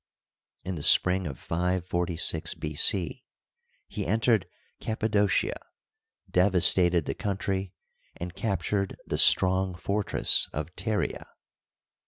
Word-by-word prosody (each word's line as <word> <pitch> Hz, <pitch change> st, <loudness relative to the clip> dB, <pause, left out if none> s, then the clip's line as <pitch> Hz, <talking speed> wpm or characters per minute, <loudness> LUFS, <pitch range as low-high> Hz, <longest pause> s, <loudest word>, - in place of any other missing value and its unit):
In 95 Hz, -, -5 dB
the 80 Hz, -, -6 dB
spring 90 Hz, +4 st, +4 dB
of 70 Hz, -, -7 dB
546 85 Hz, -1 st, -2 dB
B. 75 Hz, 0 st, -6 dB
C. 85 Hz, +3 st, +2 dB, 0.6 s
he -, -, -5 dB
entered 110 Hz, 0 st, +1 dB, 0.3 s
Cappadocia, 110 Hz, -2 st, -1 dB, 0.7 s
devastated 90 Hz, -2 st, +3 dB
the -, -, -3 dB
country, 95 Hz, -2 st, -4 dB, 0.4 s
and 85 Hz, 0 st, -7 dB
captured 100 Hz, -1 st, -2 dB
the -, -, -3 dB
strong 95 Hz, 0 st, +4 dB
fortress 100 Hz, +4 st, +1 dB
of 75 Hz, +4 st, -6 dB
Pteria. 105 Hz, +3 st, -3 dB
95 Hz, 100 wpm, -26 LUFS, 85-100 Hz, 0.7 s, spring